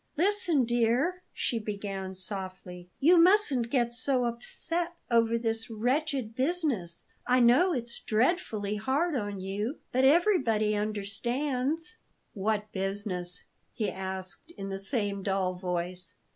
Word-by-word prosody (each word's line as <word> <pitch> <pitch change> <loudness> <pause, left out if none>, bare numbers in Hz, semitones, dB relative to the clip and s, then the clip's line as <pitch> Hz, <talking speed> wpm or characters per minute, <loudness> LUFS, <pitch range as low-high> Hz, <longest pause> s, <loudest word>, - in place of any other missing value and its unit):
"Listen, 350 -6 +3
dear," 240 +10 +1
she 235 - -1
began 200 -3 -5
softly; 185 -2 -6
"you 340 +5 +6
mustn't 335 - +4
get 240 -2 +1
so 250 +1 +1
upset 330 +9 -2 0.2
over 230 0 +4
this 225 -1 -2
wretched 255 +1 -1
business. 260 - 0 0.2
I 250 +1 +4
know 250 +10 +5
it's 235 -3 -4
dreadfully 215 - 0
hard 280 +9 0
on 205 -5 -3
you, 205 +8 -3
but 260 +1 +2
everybody 265 - +4
understands." 250 - -2 0.4
"What 210 +1 -1
business?" 190 -5 -2 0.3
he 215 - -1
asked 190 - -6
in 195 -1 -5
the 195 0 -4
same 200 -1 +1
dull 190 -1 0
voice. 180 -1 -2
230 Hz, 120 wpm, -29 LUFS, 195-275 Hz, 0.4 s, you